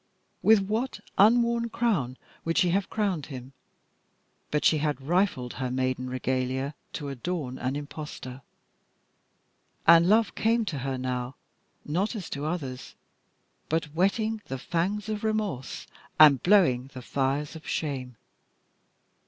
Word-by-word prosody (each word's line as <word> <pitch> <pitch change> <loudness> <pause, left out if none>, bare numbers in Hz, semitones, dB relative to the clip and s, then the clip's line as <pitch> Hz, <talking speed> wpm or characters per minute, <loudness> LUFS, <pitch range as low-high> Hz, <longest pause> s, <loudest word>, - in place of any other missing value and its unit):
With 220 -2 +6
what 220 +6 -2 0.2
an 215 +4 +8
unworn 235 -1 +1
crown 180 - 0 0.3
would 165 0 -1
she 180 -3 +4
have 195 +1 0
crowned 195 -9 -1
him! 130 -2 -9 1.0
but 150 - 0
she 155 - +5
had 150 -2 -1
rifled 150 -4 0
her 130 -1 -3
maiden 130 0 -1
regalia 130 +2 -1 0.2
to 145 -3 -4
adorn 140 -1 -4
an 130 +2 -2
impostor. 145 -3 -7 1.4
And 170 +1 +7
love 220 +1 +4
came 230 +1 +1
to 160 -8 -3
her 135 0 -2
now, 125 0 -3 0.5
not 185 +10 -1
as 195 -6 -6
to 145 +1 -3
others, 140 -6 -4 0.7
but 155 -2 -1
whetting 215 +5 +1
the 135 - -4
fangs 185 +9 -1
of 215 -1 -3
remorse 210 - -2 0.3
and 145 -4 +8
blowing 135 -10 +4
the 130 - -7
fires 140 +4 -1
of 160 - -10
shame. 130 -6 -3
150 Hz, 135 wpm, -27 LUFS, 130-200 Hz, 1.4 s, an